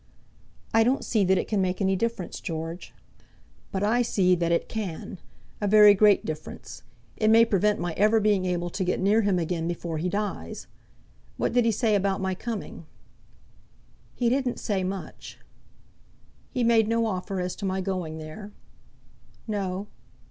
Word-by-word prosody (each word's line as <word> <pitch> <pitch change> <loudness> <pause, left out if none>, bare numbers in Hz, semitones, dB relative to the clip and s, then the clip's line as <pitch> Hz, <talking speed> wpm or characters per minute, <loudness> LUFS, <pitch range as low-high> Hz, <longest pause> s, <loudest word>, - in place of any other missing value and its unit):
"I 225 0 +5
don't 255 +4 +1
see 215 -4 +1
that 190 +1 +3
it - - -2
can 210 -3 0
make 185 -1 -1
any 195 -1 +2
difference, 210 -3 -3
George." 165 +1 -5 0.8
"But 190 0 -2
I 230 +4 +2
see 190 -6 +2
that 170 -1 0
it 170 - +1
can, 190 -4 -5 0.4
a 205 - 0
very 210 0 +8
great 205 0 +4
difference. 155 -1 -7 0.4
It 215 - +2
may 225 +1 +7
prevent 210 0 +1
my 175 -1 -2
ever 215 +5 +3
being 205 -3 +2
able 175 -1 -2
to 190 - -2
get 180 - -1
near 205 +4 +3
him 200 -3 +1
again 165 -1 -2
before 170 -2 -4
he 180 +3 -1
dies. 205 +2 -4 0.7
What - - -1
did 245 -1 +3
he 230 - +3
say 220 +1 +1
about 195 -1 +1
my 190 -1 -1
coming?" 200 -5 -6 1.3
"He 245 - 0
didn't 255 0 0
say 200 -4 -1
much." 190 0 -6 1.1
"He 250 - -1
made 230 -2 +4
no 230 0 +1
offer 195 -2 -3
as 180 0 -3
to 200 - -5
my 190 0 -1
going 180 -4 -3
there?" 160 +7 -8 1.0
"No." 195 -2 -3
195 Hz, 165 wpm, -26 LUFS, 180-215 Hz, 1.3 s, very